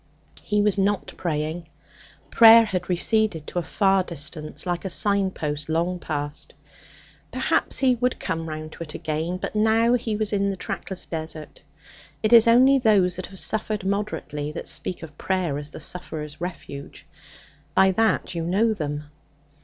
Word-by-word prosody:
He 210 Hz, 0 st, +1 dB
was 205 Hz, -1 st, +2 dB
not 200 Hz, +1 st, 0 dB
praying. 160 Hz, 0 st, -3 dB, 0.6 s
Prayer 230 Hz, 0 st, +8 dB
had 185 Hz, -4 st, -3 dB
receded 180 Hz, -2 st, +1 dB
to 175 Hz, -, -3 dB
a -, -, -1 dB
far 195 Hz, +2 st, +2 dB
distance, 155 Hz, -1 st, -5 dB
like 175 Hz, -1 st, -2 dB
a 190 Hz, -, -3 dB
signpost 180 Hz, -7 st, 0 dB
long 170 Hz, +3 st, 0 dB
passed. 145 Hz, -2 st, -5 dB, 0.8 s
Perhaps -, -, +1 dB
he 260 Hz, -2 st, +4 dB
would 250 Hz, +1 st, -1 dB
come 165 Hz, 0 st, -3 dB
round 155 Hz, 0 st, -6 dB
to -, -, -13 dB
it 150 Hz, -, -10 dB
again; 160 Hz, +3 st, -3 dB
but -, -, -5 dB
now 220 Hz, +2 st, +3 dB
he 230 Hz, -3 st, 0 dB
was 215 Hz, 0 st, -1 dB
in 200 Hz, 0 st, +1 dB
the 195 Hz, -, -2 dB
trackless 185 Hz, 0 st, -4 dB
desert. 160 Hz, -1 st, -6 dB, 0.6 s
It 215 Hz, +2 st, +3 dB
is 230 Hz, -1 st, +8 dB
only 260 Hz, +4 st, +6 dB
those 195 Hz, -7 st, +3 dB
that 185 Hz, -, -5 dB
have 190 Hz, 0 st, -8 dB
suffered 215 Hz, -2 st, -1 dB
moderately 195 Hz, -7 st, -3 dB
that -, -, -6 dB
speak 180 Hz, -, -2 dB
of 150 Hz, -2 st, -11 dB
prayer 180 Hz, -7 st, -1 dB
as 145 Hz, 0 st, -6 dB
the -, -, -10 dB
sufferer's 155 Hz, -4 st, -7 dB
refuge. 155 Hz, -5 st, -7 dB, 0.7 s
By 190 Hz, 0 st, +5 dB
that 220 Hz, -2 st, +1 dB
you 170 Hz, -, -3 dB
know 205 Hz, +7 st, +2 dB
them. 150 Hz, -5 st, -4 dB
180 Hz, 160 wpm, -24 LUFS, 160-210 Hz, 0.8 s, Prayer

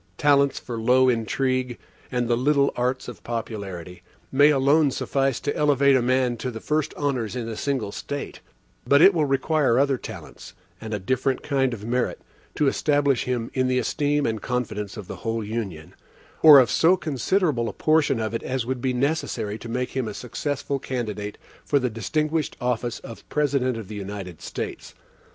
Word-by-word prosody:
Talents 140 Hz, -1 st, +3 dB
for 120 Hz, -2 st, -5 dB
low 130 Hz, +3 st, +4 dB
intrigue, 125 Hz, +2 st, 0 dB, 0.3 s
and 125 Hz, -2 st, 0 dB
the 120 Hz, -, +2 dB
little 140 Hz, +3 st, +2 dB
arts 125 Hz, +1 st, -1 dB
of 120 Hz, -, -9 dB
popularity, 100 Hz, -7 st, -5 dB, 0.3 s
may 145 Hz, +2 st, +6 dB
alone 145 Hz, +1 st, +4 dB
suffice 135 Hz, -1 st, 0 dB
to 145 Hz, -, -2 dB
elevate 140 Hz, -2 st, +4 dB
a 130 Hz, -, +3 dB
man 125 Hz, 0 st, +1 dB
to 125 Hz, -, -3 dB
the 115 Hz, -2 st, -6 dB
first 155 Hz, +3 st, -1 dB
honors 130 Hz, -6 st, -1 dB
in 120 Hz, -2 st, -3 dB
a 115 Hz, -, -4 dB
single 130 Hz, -5 st, -2 dB
State; 145 Hz, +6 st, -6 dB, 0.5 s
but 140 Hz, -, +6 dB
it 195 Hz, +2 st, +8 dB
will 160 Hz, -3 st, +2 dB
require 135 Hz, -2 st, +2 dB
other 135 Hz, -1 st, +2 dB
talents, 95 Hz, -2 st, -10 dB, 0.3 s
and 110 Hz, -1 st, -7 dB
a 105 Hz, -, 0 dB
different 130 Hz, +6 st, -1 dB
kind 135 Hz, -3 st, +1 dB
of 105 Hz, -3 st, -6 dB
merit, 125 Hz, +1 st, -1 dB, 0.4 s
to 150 Hz, -, +2 dB
establish 145 Hz, -1 st, +2 dB
him 120 Hz, -2 st, -2 dB
in 130 Hz, -1 st, +1 dB
the 130 Hz, 0 st, +1 dB
esteem 145 Hz, +3 st, 0 dB
and 110 Hz, -2 st, -1 dB
confidence 110 Hz, -5 st, -3 dB
of 105 Hz, -4 st, -8 dB
the -, -, -7 dB
whole 115 Hz, -1 st, -2 dB
Union, 100 Hz, -8 st, -5 dB, 0.5 s
or 155 Hz, -3 st, +10 dB
of 125 Hz, -5 st, +5 dB
so 175 Hz, +9 st, +4 dB
considerable 150 Hz, -, 0 dB
a -, -, -7 dB
portion 155 Hz, -5 st, +2 dB
of 110 Hz, 0 st, -2 dB
it 115 Hz, -, -2 dB
as 130 Hz, -2 st, -2 dB
would 130 Hz, 0 st, -3 dB
be 130 Hz, -1 st, 0 dB
necessary 125 Hz, -6 st, -1 dB
to 115 Hz, -, -8 dB
make 125 Hz, +2 st, -2 dB
him 130 Hz, -3 st, -2 dB
a 105 Hz, -, -5 dB
successful 140 Hz, +2 st, -3 dB
candidate 105 Hz, -6 st, -4 dB, 0.3 s
for 145 Hz, -, +2 dB
the 125 Hz, -3 st, 0 dB
distinguished 150 Hz, -, -1 dB
office 120 Hz, -1 st, -1 dB
of 115 Hz, -, -11 dB
President 140 Hz, -5 st, +1 dB
of 110 Hz, -4 st, -7 dB
the 105 Hz, -, -7 dB
United 95 Hz, -4 st, -7 dB
States. -, -, -6 dB
125 Hz, 180 wpm, -24 LUFS, 115-140 Hz, 0.5 s, or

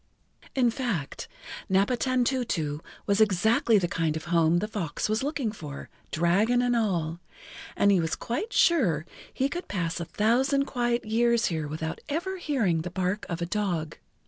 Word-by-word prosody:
In 245 Hz, -3 st, +3 dB
fact, 225 Hz, -, -3 dB, 0.4 s
Napatantutu 235 Hz, -, +1 dB, 0.3 s
was 200 Hz, +1 st, +2 dB
exactly 220 Hz, +3 st, +4 dB
the 180 Hz, -3 st, +1 dB
kind 160 Hz, -2 st, -1 dB
of 160 Hz, -, -8 dB
a -, -, -9 dB
home 165 Hz, 0 st, +4 dB
the 210 Hz, -, -1 dB
fox 190 Hz, -8 st, -3 dB
was 215 Hz, +1 st, 0 dB
looking 275 Hz, -5 st, -1 dB
for, 150 Hz, -9 st, -8 dB, 0.2 s
dragon 195 Hz, +9 st, +2 dB
and 245 Hz, -1 st, +2 dB
all, 175 Hz, -7 st, 0 dB, 0.6 s
and 200 Hz, -, +4 dB
he 195 Hz, -, +4 dB
was 165 Hz, -1 st, 0 dB
quite 395 Hz, -, -3 dB
sure 190 Hz, -, +3 dB, 0.3 s
he 265 Hz, -, 0 dB
could 345 Hz, +6 st, -5 dB
pass 175 Hz, -3 st, -2 dB
a 170 Hz, -, -3 dB
thousand 260 Hz, -, +2 dB
quiet 240 Hz, -3 st, -1 dB
years 235 Hz, +1 st, +2 dB
here 155 Hz, -2 st, -2 dB
without 160 Hz, +2 st, -4 dB
ever 345 Hz, +6 st, -2 dB
hearing 225 Hz, -, +1 dB
the 180 Hz, -, -4 dB
bark 185 Hz, +3 st, -2 dB
of 170 Hz, 0 st, -2 dB
a -, -, 0 dB
dog. 175 Hz, -5 st, -2 dB
205 Hz, 165 wpm, -27 LUFS, 170-245 Hz, 0.6 s, exactly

